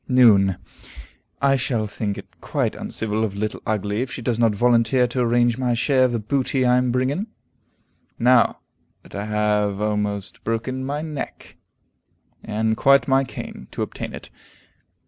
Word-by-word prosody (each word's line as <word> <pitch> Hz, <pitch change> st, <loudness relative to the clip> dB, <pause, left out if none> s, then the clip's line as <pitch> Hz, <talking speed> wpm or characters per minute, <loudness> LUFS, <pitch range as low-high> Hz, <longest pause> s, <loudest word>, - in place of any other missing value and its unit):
Noon. 105 Hz, -8 st, +5 dB, 0.9 s
"I 135 Hz, 0 st, +5 dB
shall 120 Hz, -4 st, -1 dB
think 105 Hz, -1 st, -3 dB
it -, -, -13 dB
quite -, -, -1 dB
uncivil 110 Hz, 0 st, -2 dB
of 100 Hz, -3 st, -2 dB
Little 105 Hz, +1 st, -3 dB
Ugly 105 Hz, 0 st, -1 dB
if 130 Hz, 0 st, -3 dB
she 130 Hz, -3 st, -6 dB
does 120 Hz, -1 st, -1 dB
not 115 Hz, -3 st, +3 dB
volunteer 120 Hz, +2 st, +3 dB
to 125 Hz, +1 st, -3 dB
arrange 120 Hz, 0 st, +2 dB
my 125 Hz, -2 st, +1 dB
share 130 Hz, +2 st, +3 dB
of 125 Hz, -, +1 dB
the 120 Hz, -, 0 dB
booty 130 Hz, +3 st, 0 dB
I 125 Hz, 0 st, +4 dB
am 125 Hz, -1 st, +1 dB
bringing, 130 Hz, -, 0 dB, 0.9 s
now 125 Hz, 0 st, +3 dB, 0.4 s
that -, -, -17 dB
I 100 Hz, +1 st, -4 dB
have 105 Hz, -1 st, 0 dB
almost 105 Hz, -1 st, -2 dB
broken 120 Hz, +4 st, -2 dB
my 145 Hz, +3 st, -3 dB
neck, 155 Hz, -3 st, -7 dB, 0.9 s
and 110 Hz, +1 st, 0 dB
quite 140 Hz, +4 st, +4 dB
my 135 Hz, 0 st, +3 dB
cane, 90 Hz, -, -8 dB
to -, -, -3 dB
obtain -, -, -6 dB
it." -, -, -11 dB
120 Hz, 160 wpm, -22 LUFS, 105-130 Hz, 0.9 s, Noon